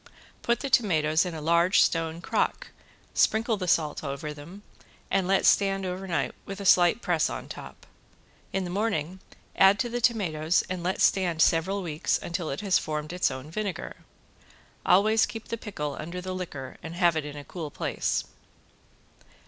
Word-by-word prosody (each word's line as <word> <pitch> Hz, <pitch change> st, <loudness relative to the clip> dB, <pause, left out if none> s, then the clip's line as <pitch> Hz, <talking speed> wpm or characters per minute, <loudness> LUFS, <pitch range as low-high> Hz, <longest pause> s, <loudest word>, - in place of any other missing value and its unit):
Put 235 Hz, 0 st, 0 dB
the 275 Hz, -, -3 dB
tomatoes 160 Hz, -6 st, +3 dB
in 170 Hz, -, -5 dB
a 155 Hz, -, -6 dB
large 170 Hz, +4 st, +3 dB
stone 165 Hz, 0 st, +1 dB
crock, -, -, -1 dB, 0.4 s
sprinkle 225 Hz, +1 st, +2 dB
the 185 Hz, -2 st, -4 dB
salt 155 Hz, -3 st, +1 dB
over 140 Hz, +1 st, -4 dB
them 170 Hz, +8 st, -12 dB, 0.5 s
and 190 Hz, -1 st, +1 dB
let 195 Hz, 0 st, +2 dB
stand 195 Hz, -1 st, +3 dB
over 185 Hz, +1 st, -4 dB
night 170 Hz, -, -1 dB
with 195 Hz, 0 st, -7 dB
a 200 Hz, -, -6 dB
slight 180 Hz, +4 st, +5 dB
press 170 Hz, -4 st, +1 dB
on -, -, -6 dB
top. -, -, -10 dB, 0.7 s
In 195 Hz, -, -1 dB
the 175 Hz, -, -5 dB
morning 190 Hz, -4 st, -1 dB, 0.4 s
add 195 Hz, +1 st, +6 dB
to 240 Hz, -, -1 dB
the 240 Hz, +1 st, -3 dB
tomatoes 175 Hz, -9 st, +1 dB
and 185 Hz, -1 st, -4 dB
let 180 Hz, +2 st, -1 dB
stand 180 Hz, -4 st, +2 dB
several 190 Hz, +4 st, +1 dB
weeks 155 Hz, -3 st, 0 dB
until 170 Hz, -1 st, -4 dB
it 135 Hz, -, -4 dB
has 195 Hz, -3 st, +3 dB
formed 155 Hz, +1 st, -4 dB
its 180 Hz, -, +2 dB
own 130 Hz, +3 st, -7 dB
vinegar. 195 Hz, -2 st, -4 dB, 0.9 s
Always 215 Hz, +4 st, +5 dB
keep 225 Hz, -1 st, -8 dB
the -, -, -1 dB
pickle 150 Hz, -11 st, -5 dB
under 170 Hz, +4 st, -5 dB
the 185 Hz, +1 st, -5 dB
liquor 145 Hz, -8 st, -6 dB
and 165 Hz, +1 st, -7 dB
have 175 Hz, -2 st, +3 dB
it 155 Hz, -, -1 dB
in 145 Hz, 0 st, -7 dB
a 145 Hz, -, -8 dB
cool 165 Hz, -4 st, -6 dB
place. -, -, -1 dB
180 Hz, 175 wpm, -27 LUFS, 155-195 Hz, 0.9 s, add